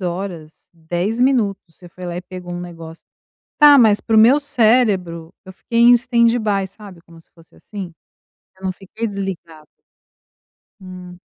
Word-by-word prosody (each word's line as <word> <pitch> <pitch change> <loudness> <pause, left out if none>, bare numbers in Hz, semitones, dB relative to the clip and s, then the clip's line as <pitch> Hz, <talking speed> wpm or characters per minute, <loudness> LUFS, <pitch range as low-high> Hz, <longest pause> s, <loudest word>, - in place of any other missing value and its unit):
horas, 175 -3 -7
10 175 +7 -4
minutos, 240 -7 +1
você 175 - -15
foi 180 +1 -12
lá 175 - -5
e 180 - -6
pegou 180 -1 -9
um 175 - -5
negócio 165 -2 -11 0.6
tá, 295 -1 +8
mas 220 -6 +4
para 225 - -1
o - - +7
meu 250 +7 +5
cérebro, 210 - 0
eu 190 - -12
fiquei 230 +5 -4
em 240 +1 +7
standby, 235 -5 +1
sabe, 195 -4 -14
como 165 -1 -18
se 165 - -25
fosse 165 -1 -23
assim. 195 -5 -9 0.7
Eu 190 - -15
não 185 - -1
fiquei 200 +5 -7
desligada. 185 -6 -7 1.1
Hum. 180 -1 -11
190 Hz, 160 wpm, -18 LUFS, 175-225 Hz, 1.1 s, tá